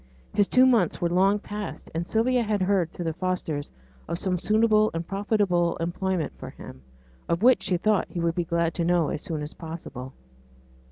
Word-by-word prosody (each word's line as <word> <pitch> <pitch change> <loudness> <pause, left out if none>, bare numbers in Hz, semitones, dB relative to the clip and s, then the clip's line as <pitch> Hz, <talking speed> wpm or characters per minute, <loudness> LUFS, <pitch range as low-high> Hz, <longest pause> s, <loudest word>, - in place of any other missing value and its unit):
His 205 -1 +3
two 255 +1 +5
months 230 -10 +3
were 170 - 0
long 195 +3 +4
past; 210 0 -7
and 165 +2 -3
Sylvia 245 +3 +2
had 210 -4 0
heard 185 -3 +2
through 175 - -6
the 165 - -1
Fosters 165 -5 -2 0.4
of 170 - -2
some 180 0 -1
suitable 215 +1 +3
and 165 0 -3
profitable 195 -4 +1
employment 175 +1 -2
for - - -7
him, 65 0 -11 0.5
of 170 +4 0
which 255 +1 +6
she 185 -1 0
thought 210 +2 +1
he 175 - -5
would 170 0 +1
be 175 - -1
glad 170 0 0
to 170 - -1
know 170 -2 +2
as - - -3
soon 160 -6 -4
as 150 - -6
possible. 160 -6 -8
180 Hz, 190 wpm, -26 LUFS, 170-205 Hz, 0.5 s, which